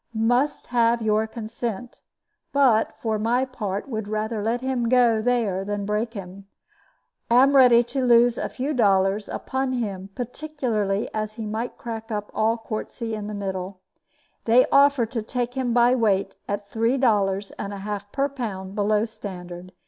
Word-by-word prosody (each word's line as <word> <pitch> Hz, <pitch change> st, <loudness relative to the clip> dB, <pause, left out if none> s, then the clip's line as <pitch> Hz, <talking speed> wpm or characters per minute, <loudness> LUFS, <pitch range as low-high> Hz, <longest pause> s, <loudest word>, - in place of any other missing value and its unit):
Must 245 Hz, +6 st, +1 dB
have 235 Hz, -1 st, +2 dB
your 215 Hz, 0 st, +2 dB
consent; 230 Hz, 0 st, -6 dB, 0.5 s
but, 255 Hz, -6 st, +3 dB
for 220 Hz, -2 st, -1 dB
my 240 Hz, +4 st, +1 dB
part, 210 Hz, -6 st, -4 dB
would 220 Hz, -5 st, -4 dB
rather 215 Hz, +1 st, -2 dB
let 230 Hz, +3 st, -1 dB
him 255 Hz, -3 st, -1 dB
go 240 Hz, -3 st, +4 dB
there 220 Hz, -6 st, 0 dB
than 205 Hz, 0 st, -3 dB
break 215 Hz, +3 st, -2 dB
him. 195 Hz, 0 st, -9 dB, 0.8 s
Am 260 Hz, +4 st, +5 dB
ready 245 Hz, -3 st, +7 dB
to 260 Hz, +2 st, -3 dB
lose 240 Hz, -1 st, +5 dB
a -, -, -2 dB
few 275 Hz, +4 st, -3 dB
dollars 200 Hz, -3 st, +2 dB
upon 265 Hz, 0 st, -2 dB
him, 200 Hz, -6 st, -3 dB
particularly 245 Hz, -6 st, -2 dB
as 215 Hz, 0 st, -3 dB
he 220 Hz, 0 st, -6 dB
might 220 Hz, +3 st, -4 dB
crack 225 Hz, -1 st, -6 dB
up 210 Hz, -1 st, -4 dB
all 225 Hz, +2 st, +1 dB
quartzy 225 Hz, +1 st, -5 dB
in 210 Hz, -1 st, -4 dB
the 210 Hz, -, -5 dB
middle. 190 Hz, -1 st, -4 dB, 0.7 s
They 235 Hz, +3 st, +5 dB
offer 280 Hz, -3 st, +5 dB
to 230 Hz, 0 st, -4 dB
take 245 Hz, +2 st, -3 dB
him 260 Hz, -2 st, -1 dB
by 240 Hz, +1 st, +4 dB
weight 210 Hz, -6 st, +1 dB
at 205 Hz, 0 st, -3 dB
three 230 Hz, +4 st, +1 dB
dollars 205 Hz, -6 st, +1 dB
and 200 Hz, -, -4 dB
a 200 Hz, -, -6 dB
half 205 Hz, 0 st, -5 dB
per 275 Hz, 0 st, +1 dB
pound 205 Hz, -9 st, -5 dB
below 210 Hz, +1 st, +1 dB
standard. 185 Hz, -5 st, -9 dB
225 Hz, 165 wpm, -24 LUFS, 205-245 Hz, 0.8 s, ready